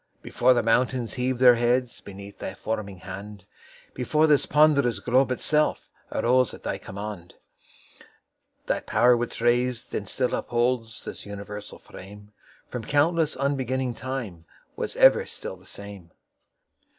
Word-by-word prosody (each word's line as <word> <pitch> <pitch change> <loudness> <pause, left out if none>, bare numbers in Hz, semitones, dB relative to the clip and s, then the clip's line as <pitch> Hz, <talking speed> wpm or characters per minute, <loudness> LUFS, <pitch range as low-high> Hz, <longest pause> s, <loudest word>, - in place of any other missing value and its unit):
Before 130 - +3
the 120 - +1
mountains 120 +1 +1
heav'd 130 0 -1
their 125 -2 +7
headsBeneath 120 -5 -2
Thy 95 - -5
forming 100 -5 -5
hand, 100 +1 -9 0.5
Before 150 +5 +2
this 150 -3 +3
ponderous 150 -5 +4
globe 130 +2 +2
itselfArose 130 -3 0
at - - -16
Thy - - -3
command; 100 -3 -8 1.3
That - - -2
Pow'r 125 0 +5
which 120 -1 -3
rais'd 120 0 +1
and 100 - -3
still 125 -2 0
upholdsThis 120 -3 -2
universal 100 0 -8
frame, 105 +2 -13 0.4
From 125 -2 -6
countless, 155 +4 +2
unbeginning 130 -2 -1
timeWas 115 -10 -7
ever - - +6
still - - -7
the 95 +1 -19
same. 100 -4 -10
120 Hz, 120 wpm, -25 LUFS, 105-130 Hz, 1.3 s, their